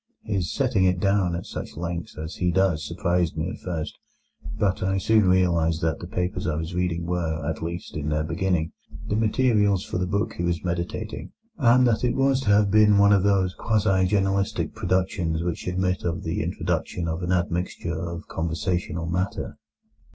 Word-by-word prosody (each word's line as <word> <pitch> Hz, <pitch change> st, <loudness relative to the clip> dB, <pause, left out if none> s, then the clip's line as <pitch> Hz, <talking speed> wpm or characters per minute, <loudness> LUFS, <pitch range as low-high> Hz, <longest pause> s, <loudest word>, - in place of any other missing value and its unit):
His 95 Hz, -5 st, -1 dB
setting 120 Hz, -9 st, +2 dB
it 90 Hz, -1 st, +2 dB
down 95 Hz, -2 st, +2 dB
at 85 Hz, -, -5 dB
such -, -, -7 dB
length 85 Hz, -1 st, -4 dB
as 80 Hz, +2 st, -6 dB
he 90 Hz, -, +1 dB
does 90 Hz, -3 st, +2 dB
surprised 85 Hz, -2 st, 0 dB
me 80 Hz, +4 st, -1 dB
at -, -, -8 dB
first; 85 Hz, -4 st, -5 dB, 0.6 s
but 95 Hz, -3 st, +1 dB
I 95 Hz, +1 st, +1 dB
soon 105 Hz, 0 st, +3 dB
realized 85 Hz, -3 st, +2 dB
that 80 Hz, -2 st, 0 dB
the 85 Hz, -, -7 dB
papers 90 Hz, 0 st, -2 dB
I 75 Hz, -, 0 dB
was 80 Hz, +3 st, -4 dB
reading 85 Hz, -1 st, -1 dB
were, 80 Hz, -4 st, -2 dB
at 80 Hz, -, -3 dB
least 85 Hz, +2 st, -5 dB
in 75 Hz, 0 st, -2 dB
their 75 Hz, 0 st, 0 dB
beginning, 85 Hz, 0 st, -1 dB, 0.4 s
the 105 Hz, -, +1 dB
materials 105 Hz, -3 st, +2 dB
for 90 Hz, -, -3 dB
the 90 Hz, -, -1 dB
book 100 Hz, +3 st, -1 dB
he 85 Hz, -, -4 dB
was 85 Hz, 0 st, -1 dB
meditating, 90 Hz, +5 st, -4 dB, 0.3 s
and 125 Hz, -1 st, +5 dB
that 115 Hz, -1 st, +2 dB
it 125 Hz, -, +1 dB
was 135 Hz, 0 st, +2 dB
to 130 Hz, -, -2 dB
have 105 Hz, -1 st, +4 dB
been 105 Hz, -1 st, +6 dB
one 100 Hz, 0 st, +6 dB
of 100 Hz, -, +4 dB
those 95 Hz, -2 st, +2 dB
quasi 100 Hz, -4 st, +2 dB
journalistic 100 Hz, +1 st, 0 dB
productions 90 Hz, -4 st, 0 dB
which 85 Hz, 0 st, -3 dB
admit 90 Hz, 0 st, 0 dB
of 85 Hz, -1 st, -2 dB
the -, -, -2 dB
introduction 85 Hz, -1 st, -2 dB
of 80 Hz, +2 st, -2 dB
an 90 Hz, 0 st, -2 dB
admixture 90 Hz, -1 st, -1 dB, 0.2 s
of 85 Hz, -1 st, -7 dB
conversational 85 Hz, +1 st, -2 dB
matter. 90 Hz, +4 st, -3 dB
90 Hz, 185 wpm, -25 LUFS, 85-100 Hz, 0.6 s, been